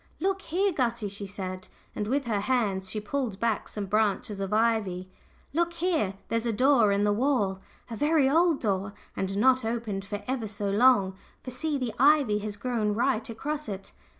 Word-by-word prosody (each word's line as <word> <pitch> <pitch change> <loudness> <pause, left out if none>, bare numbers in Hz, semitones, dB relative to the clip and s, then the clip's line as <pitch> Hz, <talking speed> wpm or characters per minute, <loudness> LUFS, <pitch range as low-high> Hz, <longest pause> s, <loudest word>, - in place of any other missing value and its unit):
"Look 390 +1 0
here, 385 +3 0
Gussie," 235 -7 -1
she 200 0 -6
said, 185 -1 -6 0.3
and 210 - -2
with 275 +3 0
her 215 -3 0
hands 200 -5 0
she 215 - -3
pulled 220 -2 -3
back 230 -3 -1
some 205 -2 -4
branches 205 0 0
of 195 0 -3
ivy 210 -5 +1 0.4
"look 340 +2 +1
here 330 - 0
there's 230 +1 -1
a - - +2
door 245 -2 +4
in 200 +1 +2
the 205 0 +3
wall 210 -5 +1 0.3
a 230 - -6
very 295 +2 +3
old 325 +2 +3
door, 200 -2 -1 0.2
and 195 +1 -2
not 260 +3 +4
opened 225 -4 -2
for 205 0 -6
ever 250 -4 -2
so 200 -1 -2
long; 205 -3 +4 0.3
for 255 - -6
see, 295 +4 -1
the 250 -4 -3
ivy 275 -6 +4
has 210 0 -5
grown 215 -2 -1
right 240 0 0
across 290 +4 -4
it." 195 -1 -6
225 Hz, 185 wpm, -28 LUFS, 200-265 Hz, 0.4 s, door